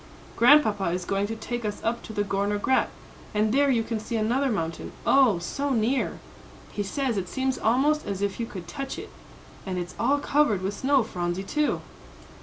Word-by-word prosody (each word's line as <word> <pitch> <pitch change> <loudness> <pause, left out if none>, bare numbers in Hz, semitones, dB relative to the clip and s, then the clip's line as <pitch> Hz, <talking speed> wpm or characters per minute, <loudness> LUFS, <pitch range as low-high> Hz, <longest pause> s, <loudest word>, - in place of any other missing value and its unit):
"Grandpapa 235 -6 +5
is 175 +1 -1
going 200 +2 0
to 225 - -4
take 240 +2 -4
us 210 -1 -3
up 235 +1 -1
to - - -9
the 205 -1 0
Gorner 200 +1 0
Grat, 260 +6 +2 0.5
and 215 +1 +2
there 280 +1 +4
you 235 -4 +2
can 225 -1 -3
see 220 +2 -5
another 245 +6 +1
mountain, 165 -7 -3
oh, 260 -8 +5
so 280 +12 -3
near! 250 +1 +1 0.5
he 205 - -3
says 245 +3 -1
it 185 -2 -3
seems 265 0 -1
almost 285 +7 +2
as 200 -1 -2
if 200 +1 -2
you 230 - -2
could 180 -6 -8
touch 270 +9 -5
it. - - -8 0.5
And 185 -2 -4
it's 175 0 -4
all 265 +6 +3
covered 285 -9 +2
with 195 +2 -1
snow, 265 +4 +2
Phronsie, 175 -3 -3
too!" 300 +9 0
220 Hz, 195 wpm, -26 LUFS, 195-265 Hz, 0.5 s, Grandpapa